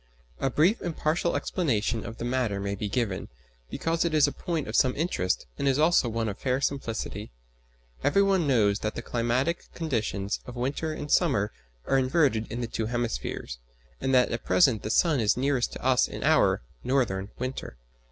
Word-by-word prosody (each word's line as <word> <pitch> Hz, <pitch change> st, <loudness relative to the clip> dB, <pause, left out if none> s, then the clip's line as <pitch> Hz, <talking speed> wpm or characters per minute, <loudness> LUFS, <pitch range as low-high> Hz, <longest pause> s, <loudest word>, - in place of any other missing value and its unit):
A 135 Hz, -, +1 dB
brief 170 Hz, -, +2 dB
and 170 Hz, -3 st, -4 dB
partial 165 Hz, +3 st, 0 dB
explanation 115 Hz, -, 0 dB
of 115 Hz, 0 st, -8 dB
the -, -, -4 dB
matter 120 Hz, -5 st, 0 dB
may 100 Hz, 0 st, -2 dB
be 100 Hz, +1 st, -3 dB
given, 105 Hz, -5 st, -1 dB, 0.4 s
because 165 Hz, 0 st, -1 dB
it 170 Hz, -2 st, 0 dB
is 150 Hz, -, +6 dB
a 145 Hz, -, 0 dB
point 165 Hz, -3 st, -3 dB
of 110 Hz, -, -4 dB
some 130 Hz, +1 st, +3 dB
interest 145 Hz, -, -1 dB
and 140 Hz, -, 0 dB
is 135 Hz, -1 st, +3 dB
also 155 Hz, -5 st, +4 dB
one 115 Hz, 0 st, -1 dB
of 100 Hz, -, -4 dB
fair 130 Hz, 0 st, 0 dB
simplicity. 115 Hz, -6 st, -3 dB, 0.7 s
Every 200 Hz, -, +4 dB
one 190 Hz, -5 st, +2 dB
knows 105 Hz, -6 st, +3 dB
that 110 Hz, -, -3 dB
the 120 Hz, -, -5 dB
climatic 125 Hz, +9 st, -1 dB
conditions 110 Hz, -10 st, -2 dB
of 125 Hz, -, -8 dB
winter 140 Hz, +6 st, -2 dB
and 150 Hz, -1 st, -6 dB
summer 120 Hz, -, +3 dB, 0.3 s
are 135 Hz, -, +3 dB
inverted 130 Hz, -5 st, +1 dB
in 120 Hz, +2 st, -3 dB
the 120 Hz, -, -2 dB
two 110 Hz, -1 st, -3 dB
hemispheres, 120 Hz, -, -3 dB, 0.4 s
and 135 Hz, -, -1 dB
that 125 Hz, -1 st, +4 dB
at 120 Hz, -, -3 dB
present 95 Hz, +5 st, +4 dB
the -, -, -4 dB
sun 150 Hz, +4 st, +3 dB
is 110 Hz, 0 st, +2 dB
nearest 130 Hz, -1 st, 0 dB
to -, -, -8 dB
us 130 Hz, -1 st, +4 dB
in -, -, -6 dB
our -, -, +3 dB, 0.2 s
(northern) 115 Hz, -7 st, 0 dB
winter. 130 Hz, -, -5 dB
125 Hz, 190 wpm, -27 LUFS, 110-145 Hz, 0.7 s, is